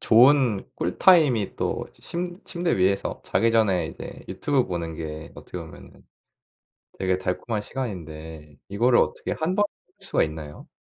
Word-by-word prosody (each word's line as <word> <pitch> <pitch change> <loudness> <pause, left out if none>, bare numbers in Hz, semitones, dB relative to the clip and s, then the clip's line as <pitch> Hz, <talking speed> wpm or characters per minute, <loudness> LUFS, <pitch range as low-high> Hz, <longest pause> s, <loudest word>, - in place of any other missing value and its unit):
좋은 120 -3 +5
꿀 90 - -3
타임이 145 - +5
또 - - -2
침 175 +1 -5
침대 175 - -1
위에서 95 +1 +1
자기 115 - +2
전에 95 -7 +3
이제 - - -9
유튜브 140 -4 +1
보는 85 -2 -3
게 80 0 -6
어떻게 - - -8
보면은 - - -12 1.0
되게 95 -1 +1
달콤한 105 +4 -2
시간인데 80 - -7
이거를 120 +5 +4
어떻게 - - 0
1 165 +4 -1
번 205 0 +4 0.3
수가 - - +1
있나요? 75 -1 -7
100 Hz, 290 characters per minute, -25 LUFS, 80-135 Hz, 1.0 s, 좋은